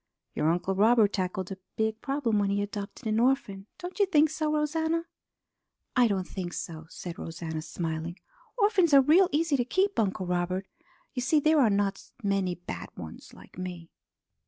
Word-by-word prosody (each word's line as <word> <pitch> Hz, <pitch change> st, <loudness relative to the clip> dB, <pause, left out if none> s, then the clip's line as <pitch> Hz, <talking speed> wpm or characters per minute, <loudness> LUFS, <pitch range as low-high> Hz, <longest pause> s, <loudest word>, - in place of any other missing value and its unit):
Your 155 Hz, -, +1 dB
Uncle 180 Hz, +3 st, 0 dB
Robert 215 Hz, +1 st, +4 dB
tackled 185 Hz, -1 st, -2 dB
a 190 Hz, -, -6 dB, 0.2 s
big 220 Hz, 0 st, -1 dB
problem 270 Hz, -6 st, 0 dB
when 200 Hz, -1 st, +1 dB
he 200 Hz, +1 st, +1 dB
adopted 205 Hz, +3 st, -6 dB
an 215 Hz, 0 st, +1 dB
orphan, 235 Hz, -6 st, +1 dB
don't 360 Hz, +2 st, -7 dB
you 405 Hz, -, +4 dB
think 310 Hz, -4 st, +4 dB
so, 310 Hz, -1 st, -1 dB
Rosanna?" 320 Hz, +2 st, 0 dB, 0.9 s
"I 250 Hz, -2 st, +5 dB
don't 190 Hz, -4 st, -1 dB
think 180 Hz, -3 st, -5 dB
so," 160 Hz, -2 st, -6 dB
said 170 Hz, 0 st, -7 dB
Rosanna, 160 Hz, -1 st, -5 dB
smiling. 165 Hz, +1 st, -4 dB, 0.4 s
"Orphans 400 Hz, -8 st, +4 dB
are 275 Hz, -, +9 dB
real 340 Hz, +7 st, +5 dB
easy 300 Hz, -1 st, +2 dB
to 245 Hz, -, +2 dB
keep, 380 Hz, +9 st, +1 dB
Uncle 190 Hz, -3 st, 0 dB
Robert. 180 Hz, +1 st, -1 dB, 0.5 s
You 250 Hz, -, -2 dB
see 275 Hz, +5 st, +3 dB
there 310 Hz, +1 st, +4 dB
are 235 Hz, -, +5 dB
not 200 Hz, -1 st, 0 dB, 0.2 s
many 195 Hz, -3 st, +1 dB
bad 90 Hz, -, -7 dB
ones 80 Hz, -2 st, -9 dB
like -, -, -14 dB
me." 175 Hz, -2 st, -6 dB
205 Hz, 175 wpm, -28 LUFS, 180-295 Hz, 0.9 s, are